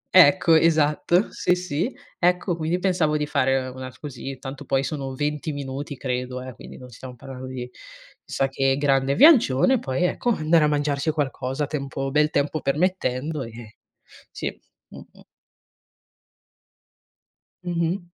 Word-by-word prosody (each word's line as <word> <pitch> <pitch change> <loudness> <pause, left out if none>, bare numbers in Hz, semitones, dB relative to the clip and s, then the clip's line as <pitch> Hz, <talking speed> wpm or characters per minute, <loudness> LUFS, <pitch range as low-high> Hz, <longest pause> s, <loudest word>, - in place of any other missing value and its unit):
Ecco, 175 0 +7
esatto. 160 +3 +3
Sì, 180 - +1
sì, 180 - -2 0.3
ecco 180 0 +2
quindi 165 +1 -1
pensavo 180 -5 +1
di 150 - -1
fare, 135 -2 +1
ehm, 130 - -7
una 130 0 -6
s 130 - -18
così, 135 -1 -7
tanto 135 +2 -8
poi 135 0 0
sono 135 -3 -4
20 150 +2 -2
minuti 140 0 -5
credo, 125 0 -3
eh, 130 0 -8
quindi - - -12
non 125 -1 -12
stiamo 125 +2 -10
parlando 130 +1 -9
di, 130 -1 -6 0.6
chissà 135 - -1
che 135 0 +1
grande 135 -1 +2
viaggione, 260 - +5
poi 130 +1 -2
ecco 180 +6 0
andare 160 -6 +3
a - - +3
mangiarci 145 0 0
qualcosa 145 -2 -2
tempo 135 -2 -4
bel 150 +2 +3
tempo 145 +1 -1
permettendo, 150 -1 -1
ehm 115 -1 -8 0.6
sì, - - -5 0.3
mh-mh. - - -14 2.4
Mh-mh. 175 +1 -1
145 Hz, 140 wpm, -24 LUFS, 135-160 Hz, 2.4 s, Ecco